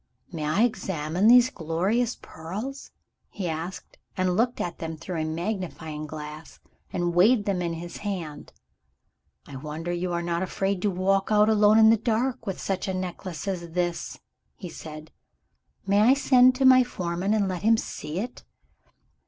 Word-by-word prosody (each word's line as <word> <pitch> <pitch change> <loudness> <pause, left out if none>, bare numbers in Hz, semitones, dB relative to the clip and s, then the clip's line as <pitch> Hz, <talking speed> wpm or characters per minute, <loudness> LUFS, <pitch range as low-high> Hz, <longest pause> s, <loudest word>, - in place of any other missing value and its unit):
"May 160 -4 -4
I 160 +9 +2
examine 185 -4 0
these 245 +1 +7
glorious 195 +9 -1
pearls?" 210 - -7 0.4
he 190 -3 -5
asked 165 +3 -6 0.2
and 185 -1 +1
looked 235 +4 +1
at 175 - -4
them 160 -1 -5
through 165 +1 -4
a - - -1
magnifying 160 -3 -4
glass, 150 +1 -9 0.3
and 175 0 -1
weighed 205 +5 +4
them 195 -3 0
in 170 -1 -2
his 170 +1 -7
hand. 180 -8 -5 1.0
"I 140 - -8
wonder 155 +5 -5
you 175 +1 -2
are 170 0 -1
not 170 0 -1
afraid 195 0 -1
to 205 - +2
walk 195 +2 +1
out 210 0 +5
alone 210 0 +5
in 220 0 +7
the 225 - +4
dark, 230 +1 -1
with 195 - -3
such 195 +1 -2
a 190 - -2
necklace 185 -1 -5
as 170 -4 -4
this," 175 -1 -2 0.4
he 180 - -8
said. 155 -1 -10 0.7
"May 200 +1 +3
I 240 +5 +6
send 255 -2 +5
to 265 +1 +1
my 255 -1 +8
foreman, 185 -3 -2
and 205 -2 +1
let 185 -2 -3
him 225 +2 +4
see 155 -6 -5
it?" 240 +6 -5
185 Hz, 170 wpm, -26 LUFS, 165-215 Hz, 1.0 s, my